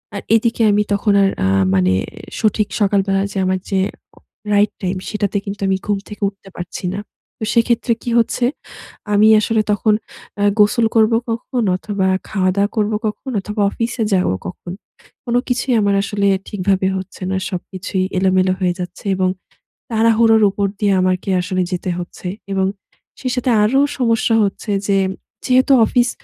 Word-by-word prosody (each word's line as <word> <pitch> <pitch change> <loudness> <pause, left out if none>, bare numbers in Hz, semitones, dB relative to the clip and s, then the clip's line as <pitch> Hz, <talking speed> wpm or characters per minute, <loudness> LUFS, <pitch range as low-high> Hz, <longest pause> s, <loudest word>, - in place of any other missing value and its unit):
আর 200 - -4
এদিকে 230 +1 +1
আমি 210 +1 +3
তখন 200 +1 +1
আর 195 - +4 0.2
আ - - +3 0.3
মানে 95 0 +3 0.5
সঠিক 215 -1 +1
সকালবেলা 195 -1 +2
যে - - -6
আমার 185 0 0
যে 195 -1 +1 0.4
উ - - -19 0.3
রাইট 205 +1 +3
টাইম, 185 0 -1
সেটাতে 205 -1 -1
কিন্তু 200 0 -6
আমি 190 - +2
ঘুম 205 -1 0
থেকে 210 0 -10
উঠতে 195 -1 -18
পারছি 175 +1 -6
না। 200 - -3 0.4
তো - - -5
সেক্ষেত্রে 235 0 +2
কি 240 - -3
হচ্ছে? 235 +1 +1 0.7
আমি 210 +1 +5
আসলে 220 0 +1
তখন 210 +1 +2 0.5
আ - - +2 0.2
গোসল 210 +3 +4
করবো 225 0 +4
কখন 235 +2 -2
অথবা, 195 0 -2 0.2
খাওয়া-দাওয়া 195 0 +1
করবো 215 0 +1
কখন 255 +5 -5
অথবা, 210 +2 -4
অফিসে 230 0 -2
যাব 185 -1 +2 0.2
কখন? 175 - -8 0.5
কোনো 245 0 +1
কিছুই 250 +1 0
আমার 200 -1 +2
আসলে 200 0 0 0.2
ঠিকভাবে 190 -1 0
হচ্ছে 190 0 -8
না। 190 - 0
সবকিছুই 185 +1 -3
এলোমেলো 185 0 +2
হয়ে 180 -1 +1
যাচ্ছে। 180 +2 -7
এবং 185 0 +1 0.6
তাড়াহুড়োর 225 0 +4
উপর 200 +1 -1
দিয়ে 205 -2 +2
আমাকে 185 +2 0
আসলে 185 0 -1
যেতে 180 +1 -3
হচ্ছে। 175 +1 -7 0.3
এবং 190 -1 +1 0.5
সেই 255 -2 -2
সাথে 250 0 -1
আরো 245 +6 +3 0.2
সমস্যা 230 -2 +2
হচ্ছে 205 +2 -3 0.2
যে, 195 - +3 0.5
যেহেতু 260 +1 +4
অফিস 245 +1 +2
205 Hz, 160 wpm, -18 LUFS, 190-225 Hz, 0.7 s, আমি